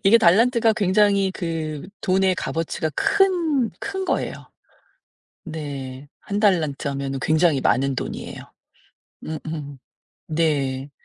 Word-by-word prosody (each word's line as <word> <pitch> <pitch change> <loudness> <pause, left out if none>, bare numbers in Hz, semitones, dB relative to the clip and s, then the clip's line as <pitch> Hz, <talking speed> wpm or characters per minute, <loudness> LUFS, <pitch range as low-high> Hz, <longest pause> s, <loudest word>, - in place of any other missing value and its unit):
이게 225 +4 +7
달란트가 230 +4 +4
굉장히 200 -1 +3
그 160 -2 -4
돈의 190 0 +2
값어치가 160 -2 -2
큰 370 - +2 0.3
큰 385 -1 -4
거예요. - - -1 1.1
네. 140 -4 -6
1 200 0 -3
달란트 165 -9 +2
하면은 135 -1 -3
굉장히 155 -3 +3
많은 135 +2 +2
돈이에요. - - -5 0.9
음음. 155 -3 -6 0.5
네. 145 -4 0
160 Hz, 215 characters per minute, -23 LUFS, 145-200 Hz, 1.1 s, 이게